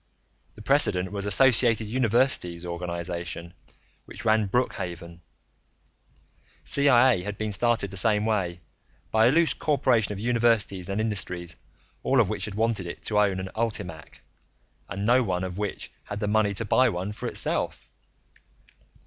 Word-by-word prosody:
The 105 - -12
precedent 100 -9 +2
was 100 -1 -4
the - - -2
Associated 115 0 +5
Universities 115 -7 0
organization 85 0 -5 0.5
which - - -11
ran 110 -1 +3
Brookhaven; 85 -7 -3 1.4
CIA 130 -6 +4
had 105 +2 -6
been 110 -1 -3
started 115 -1 0
the 95 - -5
same 105 +1 +2
way, 90 -6 -1 0.5
by 110 +1 +4
a - - +4
loose 165 +2 +3
corporation 130 -8 +1
of 100 - -5
universities 115 -5 +1
and 100 +2 -2
industries 90 -5 -3 0.5
all 135 0 +2
of 110 -5 +3
which 105 - -2
had 105 - -7
wanted 105 -5 -2
to 105 -1 0
own 100 -2 +2
an 95 0 -5
ULTIMAC 90 -8 -5 0.7
and 100 0 -4
no 125 +3 +4
one 95 -6 -2
of 95 +1 -5
which 105 -2 -4
had - - -7
had 100 - -4
the 105 - -2
money 105 -1 +1
to 115 - -3
buy 130 +5 +3
one 90 +3 -4
for 105 - -6
itself. - - -3
105 Hz, 150 wpm, -26 LUFS, 90-115 Hz, 1.4 s, Associated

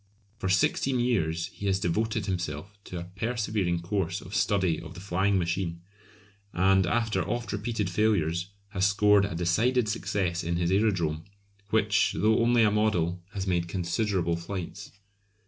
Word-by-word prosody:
For 95 - -2
sixteen 125 +7 +2
years 85 -10 +1
he 100 - -5
has 95 -1 +2
devoted 110 +4 -1
himself 90 0 -4
to 90 - -6
a 90 +1 -10
persevering 105 -5 -1
course 95 -1 -1
of 90 - -11
study 100 -4 +1
of 80 - -10
the - - -8
flying 95 +1 +1
machine, 85 -1 -2 0.7
and 95 +1 +3
after 115 +2 +1
oft 120 -1 -3
repeated 105 0 -2
failures 90 -3 +1 0.2
has 95 -1 +1
scored 105 0 +4
a 100 - -4
decided 110 +8 +2
success 95 -5 -1
in 85 +1 -1
his 85 +1 0
Aerodrome, 90 -6 +1 0.4
which, 110 0 +2
though 110 +1 +3
only 120 0 +4
a 105 - +4
model, 90 -5 +1
has 95 -1 -3
made 85 -2 0
considerable 90 0 0
flights. 90 +2 -6
95 Hz, 150 wpm, -28 LUFS, 85-105 Hz, 0.7 s, scored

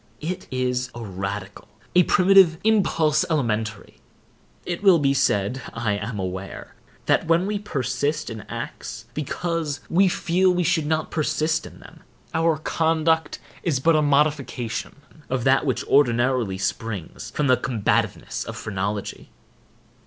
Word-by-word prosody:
It 180 +4 -4
is 125 0 -1
a 120 - -6
radical, 95 0 -6 0.3
a 180 - +7
primitive 185 -2 +5
impulse—elementary. 155 - +1 0.7
It 175 +1 -3
will 195 -4 +6
be 140 -3 +2
said, 120 0 +1
I 115 -2 -1
am 105 +2 -4
aware, 95 0 -6 0.3
that - - +2
when 165 +2 +3
we 205 0 -1
persist 145 - -2
in 110 -1 -6
acts - - -6
because 155 0 -2
we 190 +3 +5
feel 185 +1 +2
we 180 0 +1
should 165 -3 +1
not 155 0 -1
persist 155 +1 0
in - - -14
them, - - -15 0.3
our 160 -1 +2
conduct 160 0 +1 0.2
is 150 -7 0
but 165 +4 +3
a 155 - +4
modification 140 -5 0 0.3
of 130 -2 -1
that 135 +3 +3
which 130 - -1
ordinarily 120 -6 +2
springs 100 -2 -4
from 150 - +1
the 130 -2 +5
combativeness 115 -5 -1
of - - -7
phrenology. 100 0 -4
145 Hz, 135 wpm, -23 LUFS, 115-165 Hz, 0.7 s, a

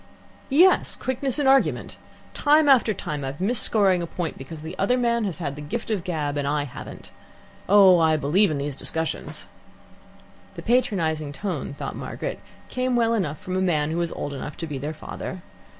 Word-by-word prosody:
"Yes. 345 +7 +4
Quickness 260 +1 -2
in 290 - 0
argument. 270 0 +2 0.4
Time 300 +1 +4
after 255 -5 +5
time 150 -7 -4
I've 135 +2 -5
missed 210 +5 +1
scoring 195 -5 +4
a 170 - -3
point 165 -2 -4
because 150 +3 -9
the 160 +3 -6
other 225 +6 +2
man 235 -2 +1
has 190 -5 -3
had 140 -5 -4
the 150 - -8
gift 225 +11 -4
of 210 - +1
the - - -11
gab 150 -5 -2
and 140 -1 -1
I 145 0 0
haven't. 140 - -10 0.6
Oh, 195 -3 +7
I 160 -1 +3
believe 175 +8 +3
in 155 - -1
these 140 0 -3
discussions." 160 +3 -3 1.1
The - - -8
patronizing 165 - +1
tone 160 -6 -4
thought - - -5
Margaret, - - -5 0.3
came 255 0 -1
well 230 -1 +2
enough 175 -9 -1
from 185 +4 -5
a 185 - +1
man 155 -5 +1
who 165 - -2
was 170 -1 -1
old 145 - -5
enough 145 +2 -6
to 170 - -4
be 145 -4 -5
their 150 +3 -4
father. 180 +3 -7
175 Hz, 195 wpm, -24 LUFS, 150-230 Hz, 1.1 s, Oh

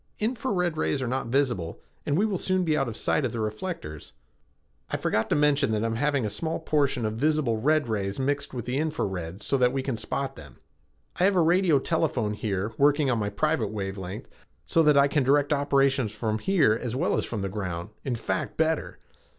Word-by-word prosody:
"Infra 240 +4 -1
red 180 -4 0
rays 145 - 0
are 130 - -2
not 130 0 -2
visible, 120 -10 0 0.3
and 145 - +1
we 205 - +3
will 200 -5 -1
soon 185 -1 +1
be 160 -3 +1
out 135 -3 +1
of 115 - -5
sight - - +1
of 125 - -1
the 115 - -3
reflectors." 110 - -5 0.8
"I - - -1
forgot 110 - 0
to - - +2
mention 150 -3 +3
that 105 0 0
I - - +1
am 115 0 -1
having 140 -2 +1
a - - -1
small 160 +6 -2
portion 140 -6 0
of 110 0 -2
visible 150 -4 +1
red 155 +1 +2
rays 100 -3 -2
mixed 140 +2 -1
with 120 -4 -5
the 125 +3 -1
infra 155 0 -1
red 95 0 -5
so 135 - +1
that 125 -1 +4
we 135 0 -2
can 130 -4 -2
spot 135 +4 -3
them. 70 -5 -13 0.6
I 180 - +4
have 200 0 +3
a 180 - +4
radio 170 -1 +4
telephone 135 -8 0
here, 105 -1 -2
working 145 -1 +4
on 120 - +1
my 105 -1 -1
private 120 +1 0
wavelength, 95 -1 -5 0.4
so 165 - +3
that 150 -2 +5
I 140 0 +6
can 145 +1 +1
direct 145 +3 +3
operations 140 -4 +2
from 110 0 -2
here 160 - +3
as 120 -1 -3
well 130 - +1
as - - 0
from 110 -4 -4
the - - -1
ground 95 -1 -4
in 130 -3 -1
fact, 95 -4 -3
better. 160 0 0
135 Hz, 220 wpm, -26 LUFS, 110-155 Hz, 0.8 s, I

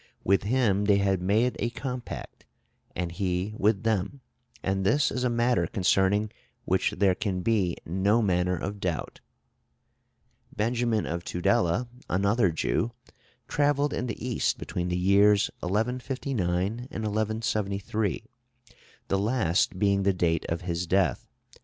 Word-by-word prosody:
With 100 +1 +3
him 105 -3 +1
they 100 -1 +4
have 95 -2 +1
made 110 +7 +2
a 120 - 0
compact, 125 0 -6 0.5
and 85 -1 -2
he 90 +3 -2
with 105 0 +1
them; 110 +4 -1 0.4
and 95 0 0
this 145 +10 +2
is 125 - -2
a 125 - +2
matter 120 +1 +2
concerning 100 +1 +2 0.3
which 95 +1 +1
there 95 -1 +4
can 95 -2 -2
be 95 -4 +1
no 95 +6 +2
manner 90 -2 +1
of 100 +5 -5
doubt." 90 -4 -3 1.4
Benjamin 115 0 0
of 85 +1 -3
Tudela, 90 +4 +1 0.2
another 100 +2 +2
Jew, 110 +8 -1 0.5
travelled 145 0 +1
in 125 - -2
the 115 +1 -5
East 120 - 0
between 90 0 -4
the 90 0 -1
years 100 - +4
1159 125 +2 -2 0.2
and 115 +4 -5
1173, 110 -2 -2 0.8
the 95 - +1
last 100 -5 +1
being 100 0 +2
the 100 0 +2
date 85 -3 0
of 85 0 -2
his 90 -1 -3
death. 90 -7 +1
100 Hz, 135 wpm, -27 LUFS, 90-115 Hz, 1.4 s, they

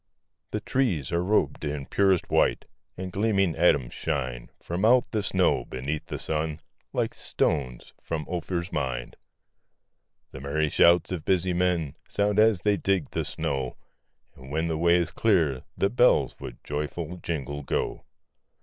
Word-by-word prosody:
The 105 - -3
trees 105 - 0
are 85 0 +1
rob'd 90 -8 +1
in 75 -2 -3
purest 95 0 +2
white, - - +2 0.3
And 95 0 -5
gleaming 95 -3 +1
atoms 75 -7 +3
shine - - -3
From 85 +3 -4
out 125 +3 +5
the 110 - 0
snow, 95 -3 +2
beneath 70 +4 -4
the - - -4
sun, 75 0 -2 0.3
Like - - -1
stones 65 -5 -1
from 80 -2 -4
Ophir's 85 0 -3
mine. 65 -4 -3 1.2
The 70 - -9
merry 75 +2 0
shouts 85 +4 +4
of 90 -4 -3
busy 90 0 +1
men 85 -5 0 0.2
Sound, 100 0 +1
as 110 -4 +4
they 105 -1 +2
dig 95 -7 0
the - - -1
snow; 65 -3 -3 0.6
And, 65 0 -13
when 80 +3 -1
the 80 - -1
way 85 +1 +4
is 85 -1 +1
clear, 80 - +1
the 100 - +1
bells 125 +1 +3
With - - -9
joyful 75 +4 -4
jingle, 75 -4 -4
go. 70 - -2
85 Hz, 150 wpm, -26 LUFS, 75-95 Hz, 1.2 s, out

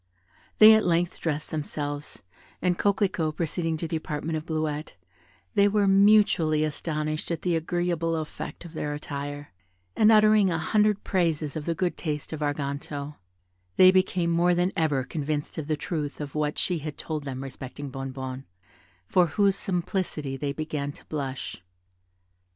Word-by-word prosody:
They 220 +1 +10
at 220 - +4
length 175 0 +1
dressed 150 -2 -2
themselves, 145 -1 -4 0.4
and 180 -1 +1
Coquelicot 185 -6 +1
proceeding 165 0 -1
to 165 - -3
the 160 - -1
apartment 155 +1 -3
of 155 +1 -4
Bleuette, 155 -1 -2 0.6
they 200 - +5
were 205 0 +2
mutually 195 -6 +5
astonished 155 0 -2
at 170 -2 -3
the 175 -2 +1
agreeable 165 0 0
effect 160 +2 -6
of 170 - -10
their 150 -2 -3
attire, 145 -3 -6 0.4
and 215 +1 +5
uttering 215 -2 +6
a 165 - 0
hundred 210 +5 +2
praises 165 -5 0
of 155 -2 -4
the 170 - -1
good 180 +1 -1
taste 150 -2 -4
of 155 - -4
Arganto, 145 0 -3 0.6
they 185 0 +8
became 185 -2 +2
more 175 +1 +3
than 175 +2 +1
ever 150 -5 +1
convinced 150 +2 -3
of 150 - -5
the 155 -1 0
truth 150 -2 -4
of 145 -2 -5
what 150 -1 -1
she 180 -3 0
had 150 0 -6
told 155 -2 -4
them 135 -1 -5
respecting 135 +1 -7
Bonnebonne, 130 0 -5 0.6
for 180 - +3
whose 195 +4 +2
simplicity 175 -7 -2
they 140 +1 -2
began 150 -1 -3
to - - -16
blush. 135 - -4
155 Hz, 155 wpm, -26 LUFS, 145-175 Hz, 0.6 s, They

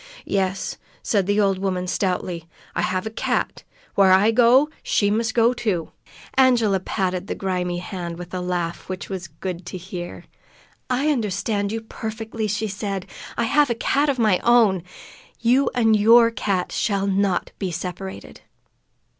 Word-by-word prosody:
"Yes," 190 -1 -1 0.2
said 200 -4 +1
the 205 +1 +2
old 195 -2 +2
woman 185 -2 -1
stoutly. 180 -3 -2 0.3
"I - - -1
have 185 +1 -1
a 220 - -4
cat. 225 - -2 0.3
Where 195 -1 +5
I 195 +4 +5
go, 245 +5 +5
she 205 -1 +1
must 220 +1 0
go, 235 +1 +4
too!" 190 -9 -2 0.4
Angela 240 -7 +4
patted 185 -1 -2
the - - -3
grimy 180 -2 -2
hand, 175 -2 -5
with 175 0 -9
a 185 - -2
laugh 175 -1 -3
which 185 +1 -5
was 185 -2 -4
good 175 +3 -6
to 185 - -5
hear. 175 -1 -7 0.7
"I 260 +4 +1
understand 205 -4 -1
you 225 0 -3
perfectly," 220 0 -5
she 210 +1 -1
said. 195 -2 -4 0.3
"I - - +1
have 285 +4 +3
a 235 - 0
cat 285 +5 +1
of 275 - 0
my 215 -6 +3
own. 225 -6 +4 0.6
You 250 +4 +3
and 225 -3 +4
your 230 +2 +6
cat 195 -4 -1
shall 200 -2 0
not 195 -2 0
be 190 - -2
separated." 180 +3 -6
200 Hz, 160 wpm, -23 LUFS, 185-225 Hz, 0.7 s, your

